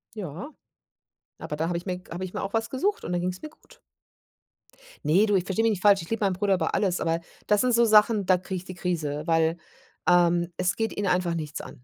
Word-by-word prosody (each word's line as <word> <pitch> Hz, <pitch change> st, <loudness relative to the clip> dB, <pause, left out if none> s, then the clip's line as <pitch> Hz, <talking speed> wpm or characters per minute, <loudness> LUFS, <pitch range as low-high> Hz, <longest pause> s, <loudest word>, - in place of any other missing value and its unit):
Ja, 195 Hz, -, -6 dB, 0.9 s
aber 150 Hz, -, -6 dB
da 160 Hz, +2 st, -1 dB
habe 175 Hz, -, -1 dB
ich 175 Hz, -, -11 dB
mir 180 Hz, -1 st, -2 dB
g 180 Hz, -, -20 dB
habe 180 Hz, +2 st, -4 dB
ich 185 Hz, -, -8 dB
mir -, -, -3 dB
auch 195 Hz, -, -4 dB
was 225 Hz, 0 st, 0 dB
gesucht 395 Hz, +11 st, -1 dB
und 180 Hz, -, -4 dB
dann 175 Hz, -, 0 dB
ging's 180 Hz, +1 st, -3 dB
mir 310 Hz, -, -7 dB
gut. -, -, -22 dB, 1.3 s
Ne, 180 Hz, +8 st, +4 dB
du, 205 Hz, -2 st, +1 dB
ich 185 Hz, -1 st, +1 dB
versteh 200 Hz, +4 st, 0 dB
mich 225 Hz, -, +3 dB
nicht 190 Hz, -3 st, -3 dB
falsch, 200 Hz, -3 st, +5 dB
ich -, -, -12 dB
liebe 225 Hz, -2 st, -1 dB
meinen 195 Hz, -, +2 dB
Bruder 195 Hz, +1 st, +1 dB
über 165 Hz, -3 st, -1 dB
alles, 185 Hz, -3 st, +1 dB
aber 165 Hz, 0 st, 0 dB, 0.3 s
das 210 Hz, -1 st, +3 dB
sind 250 Hz, -1 st, +2 dB
so 235 Hz, 0 st, +5 dB
Sachen, 215 Hz, -1 st, +4 dB
da 185 Hz, -1 st, +5 dB
kriege 185 Hz, +1 st, -5 dB
ich 180 Hz, -, -8 dB
die 185 Hz, -, -8 dB
Krise, 155 Hz, -5 st, -2 dB
weil, 165 Hz, 0 st, +2 dB, 0.5 s
ähm, 175 Hz, -1 st, +3 dB
es 180 Hz, +1 st, 0 dB
geht 225 Hz, 0 st, -2 dB
ihn 205 Hz, -1 st, -2 dB
einfach 180 Hz, -1 st, +1 dB
nichts 150 Hz, -3 st, -5 dB
an. -, -, -12 dB
185 Hz, 250 wpm, -26 LUFS, 170-210 Hz, 1.3 s, falsch